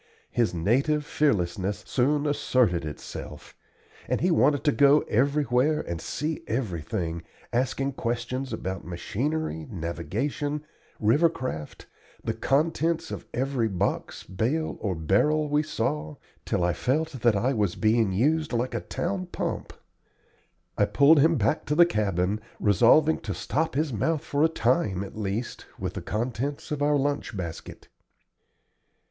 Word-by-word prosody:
His 120 Hz, -2 st, +1 dB
native 135 Hz, -, +1 dB
fearlessness 100 Hz, -, 0 dB
soon 145 Hz, +3 st, +1 dB
asserted 125 Hz, -, +2 dB
itself, 75 Hz, -, -8 dB, 0.5 s
and -, -, 0 dB
he 180 Hz, -, +2 dB
wanted 145 Hz, -3 st, +3 dB
to 150 Hz, -, +4 dB
go 145 Hz, +1 st, +5 dB
everywhere 140 Hz, +3 st, +2 dB
and 85 Hz, -1 st, -5 dB
see 155 Hz, +1 st, -3 dB
everything, 85 Hz, -, -2 dB, 0.3 s
asking 135 Hz, +2 st, 0 dB
questions 120 Hz, +3 st, -3 dB
about 95 Hz, -1 st, -4 dB
machinery, 110 Hz, -, -3 dB
navigation, 120 Hz, -, -3 dB, 0.3 s
river 145 Hz, +11 st, +4 dB
craft, 125 Hz, -, -6 dB, 0.4 s
the -, -, -1 dB
contents 160 Hz, +3 st, 0 dB
of -, -, -6 dB
every 130 Hz, -2 st, 0 dB
box, 95 Hz, -4 st, -2 dB
bale, 130 Hz, +12 st, -1 dB
or 100 Hz, -4 st, -1 dB
barrel 150 Hz, -, +2 dB
we 150 Hz, +1 st, +3 dB
saw, 75 Hz, -, -2 dB, 0.3 s
till 90 Hz, -, 0 dB
I 90 Hz, 0 st, +2 dB
felt 150 Hz, -, 0 dB
that 120 Hz, -2 st, +4 dB
I 125 Hz, +7 st, +1 dB
was 105 Hz, -7 st, 0 dB
being 110 Hz, -2 st, +2 dB
used 150 Hz, +9 st, +1 dB
like 120 Hz, +2 st, -1 dB
a -, -, -2 dB
town 185 Hz, +1 st, -3 dB
pump. -, -, -4 dB, 1.1 s
I -, -, +5 dB
pulled 145 Hz, +2 st, +5 dB
him 160 Hz, +3 st, +5 dB
back 115 Hz, +4 st, +1 dB
to 150 Hz, -, 0 dB
the 175 Hz, +2 st, +8 dB
cabin, 100 Hz, -, 0 dB, 0.2 s
resolving 150 Hz, -, +4 dB
to 100 Hz, -2 st, -5 dB
stop 160 Hz, 0 st, -1 dB
his 150 Hz, -2 st, 0 dB
mouth 155 Hz, +8 st, 0 dB
for 145 Hz, -2 st, 0 dB
a 160 Hz, -, +5 dB
time 110 Hz, -, +1 dB
at 100 Hz, -, -9 dB
least 110 Hz, +3 st, -4 dB
with -, -, -4 dB
the -, -, -5 dB
contents 125 Hz, +7 st, -3 dB
of 150 Hz, -1 st, -2 dB
our 145 Hz, 0 st, +3 dB
lunch 140 Hz, -6 st, -1 dB
basket. 85 Hz, -3 st, -7 dB
125 Hz, 140 wpm, -26 LUFS, 100-150 Hz, 1.1 s, the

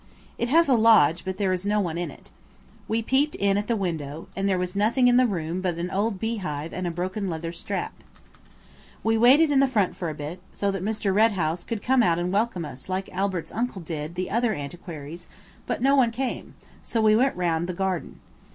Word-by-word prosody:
It 235 Hz, -, 0 dB
has 330 Hz, +4 st, +5 dB
a 270 Hz, -, +4 dB
lodge, 220 Hz, -9 st, +5 dB
but 190 Hz, 0 st, -4 dB
there 195 Hz, -2 st, +1 dB
is 180 Hz, 0 st, -2 dB
no 210 Hz, +1 st, +1 dB
one 175 Hz, -5 st, -1 dB
in 175 Hz, 0 st, -3 dB
it. -, -, -15 dB, 0.6 s
We 225 Hz, +1 st, 0 dB
peeped 275 Hz, +6 st, +1 dB
in 200 Hz, 0 st, +2 dB
at 205 Hz, +1 st, -1 dB
the 235 Hz, -, +1 dB
window, 160 Hz, -6 st, -4 dB
and 195 Hz, +1 st, 0 dB
there 190 Hz, -, +2 dB
was 180 Hz, +1 st, -3 dB
nothing 230 Hz, +5 st, +3 dB
in 245 Hz, 0 st, +5 dB
the 255 Hz, 0 st, +5 dB
room 175 Hz, -3 st, -3 dB
but 180 Hz, -3 st, -1 dB
an 175 Hz, +2 st, -3 dB
old 200 Hz, 0 st, -1 dB
beehive 185 Hz, -9 st, -3 dB
and 185 Hz, -1 st, -3 dB
a -, -, 0 dB
broken 185 Hz, +4 st, -3 dB
leather 165 Hz, 0 st, -4 dB
strap. 170 Hz, -, -4 dB, 1.1 s
We 225 Hz, 0 st, +2 dB
waited 270 Hz, +7 st, +6 dB
in 275 Hz, -, +4 dB
the 275 Hz, -, +5 dB
front 210 Hz, -8 st, +1 dB
for 170 Hz, -, -3 dB
a 155 Hz, -, -5 dB
bit, 150 Hz, +4 st, -6 dB
so 200 Hz, -1 st, 0 dB
that 195 Hz, -2 st, -4 dB
Mr. 210 Hz, -2 st, -1 dB
Red 220 Hz, +2 st, +4 dB
House 170 Hz, -1 st, -1 dB
could 225 Hz, -3 st, -5 dB
come 260 Hz, 0 st, +3 dB
out 170 Hz, -7 st, +3 dB
and 175 Hz, +2 st, -2 dB
welcome 205 Hz, -5 st, 0 dB
us 130 Hz, +2 st, -10 dB
like 190 Hz, +1 st, -2 dB
Albert's 190 Hz, -2 st, -2 dB
uncle 225 Hz, -5 st, -3 dB
did 155 Hz, 0 st, -5 dB
the 185 Hz, +1 st, -3 dB
other 230 Hz, 0 st, +1 dB
antiquaries, 155 Hz, +2 st, -8 dB, 0.4 s
but -, -, -2 dB
no 275 Hz, +1 st, +5 dB
one 255 Hz, -4 st, +4 dB
came, 250 Hz, +2 st, -4 dB, 0.3 s
so 230 Hz, -, -2 dB
we 215 Hz, -1 st, +5 dB
went 260 Hz, +4 st, +2 dB
round 170 Hz, -1 st, 0 dB
the -, -, -2 dB
garden. 190 Hz, -2 st, -3 dB
195 Hz, 225 wpm, -25 LUFS, 175-225 Hz, 1.1 s, waited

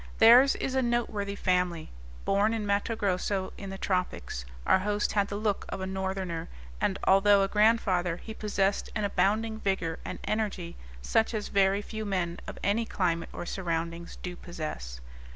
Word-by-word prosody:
Theirs 245 Hz, +5 st, +8 dB
is 265 Hz, -, -2 dB
a 265 Hz, -, +2 dB
noteworthy 225 Hz, -5 st, -1 dB
family. 180 Hz, -4 st, 0 dB, 0.3 s
Born 205 Hz, +3 st, +2 dB
in 215 Hz, -2 st, -2 dB
Matto 200 Hz, +3 st, 0 dB
Grosso, 195 Hz, -1 st, -1 dB
in 195 Hz, -, -7 dB
the 195 Hz, -, -6 dB
tropics, 180 Hz, -, -2 dB, 0.2 s
our -, -, +5 dB
host 205 Hz, +2 st, 0 dB
had 200 Hz, -1 st, +2 dB
the 200 Hz, -, -4 dB
look 205 Hz, -1 st, 0 dB
of -, -, -4 dB
a 190 Hz, -, -3 dB
northerner 190 Hz, -3 st, -3 dB, 0.3 s
and, 190 Hz, -, +1 dB
although 195 Hz, +1 st, +5 dB
a -, -, +1 dB
grandfather, 195 Hz, -5 st, +2 dB
he 220 Hz, -, -8 dB
possessed 200 Hz, -2 st, 0 dB
an 215 Hz, -, -1 dB
abounding 210 Hz, +3 st, +1 dB
vigor 190 Hz, -6 st, -1 dB
and -, -, -5 dB
energy 200 Hz, -6 st, -2 dB, 0.3 s
such 225 Hz, -, +2 dB
as 210 Hz, -, -3 dB
very 195 Hz, +1 st, +3 dB
few 220 Hz, 0 st, -5 dB
men 180 Hz, -4 st, -2 dB
of -, -, -7 dB
any 205 Hz, +4 st, +2 dB
climate 170 Hz, -5 st, -1 dB
or -, -, -6 dB
surroundings 170 Hz, -2 st, -3 dB
do 180 Hz, -1 st, -4 dB
possess. 110 Hz, -, -6 dB
195 Hz, 170 wpm, -29 LUFS, 180-210 Hz, 0.3 s, Theirs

